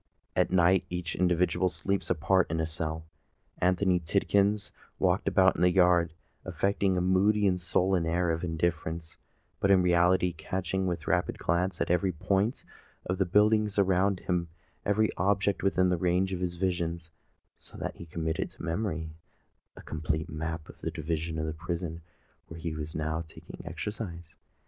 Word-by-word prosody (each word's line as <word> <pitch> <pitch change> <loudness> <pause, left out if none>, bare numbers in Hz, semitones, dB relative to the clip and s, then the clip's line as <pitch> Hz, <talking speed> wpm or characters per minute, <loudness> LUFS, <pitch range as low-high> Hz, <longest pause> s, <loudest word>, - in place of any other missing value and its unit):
At - - +2
night 95 0 +4
each 90 -2 -4
individual 90 0 +2
sleeps 100 +2 -2
apart 90 +4 +2
in 80 +1 -1
a 80 - +1
cell. 80 0 -4 0.5
Anthony 90 0 +2
Tidkins 100 +4 +1 0.3
walked - - +1
about - - +5
the 90 +2 +4
yard, 90 -3 +4 0.3
affecting 100 -1 0
a - - +1
moody 100 +3 +3
and 90 -2 +2
sullen 90 0 +1
air 85 +1 +1
of 80 +1 -2
indifference, 80 -1 -2 0.4
but 100 - +1
in 95 -2 +5
reality 90 0 +3
catching 95 +3 -2
with 85 -3 -3
rapid 90 +2 0
glance 90 +3 0
every 90 +2 +2
point 95 +7 0 0.4
of 90 +1 -2
the 95 - +2
buildings 105 +2 +3
around 95 0 +2
him—every 90 +5 -1
object 100 +2 +1
within 95 -1 +2
the 90 - +1
range 90 +2 +1
of 90 - -3
his 90 -1 -2
vision; 85 -2 -1 0.6
so - - -13
that - - -5
he 85 - -9
committed 80 0 -2
to - - -13
memory 85 -2 -2 0.6
a - - -12
complete 80 0 -3
map 80 0 -4
of - - -14
that 80 0 -4
division 80 0 -2
of 80 - -1
the 80 - -3
prison 85 0 -4 0.5
where 80 - -9
he 80 -1 -3
was 75 0 -6
now 80 +1 -1
taking 80 - -11
exercise. 85 -1 -6
90 Hz, 160 wpm, -29 LUFS, 80-95 Hz, 0.6 s, about